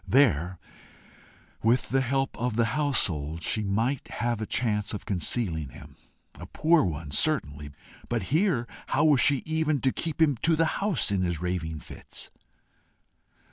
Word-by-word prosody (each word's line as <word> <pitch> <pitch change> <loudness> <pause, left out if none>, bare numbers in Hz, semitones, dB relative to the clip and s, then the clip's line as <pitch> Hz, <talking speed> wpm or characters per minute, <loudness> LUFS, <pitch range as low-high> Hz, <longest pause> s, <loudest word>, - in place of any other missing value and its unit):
There, 95 - +3 1.0
with 115 +3 +2
the 135 +2 +2
help 135 +1 -1
of 120 -1 -2
the 115 0 +3
household, 85 - 0
she 110 - +1
might 115 +7 -1
have 120 -2 -2
a 110 - -3
chance 105 -3 -1
of - - -8
concealing 85 - -1
him - - -13 0.4
a - - -8
poor 160 -1 +3
one, 75 -3 -4
certainly! 75 - 0 0.4
but 120 -4 -1
here, 160 - +2 0.2
how - - +2
was 145 -5 +5
she 140 -3 +3
even 155 -2 0
to 130 - +2
keep 160 +2 -4
him 150 -5 +3
to 165 +7 +2
the 165 +1 +3 0.2
house 195 - +2
in 100 -2 +1
his 85 -3 -1
raving 80 -3 -3
fits? - - -9
115 Hz, 155 wpm, -27 LUFS, 90-145 Hz, 1.0 s, was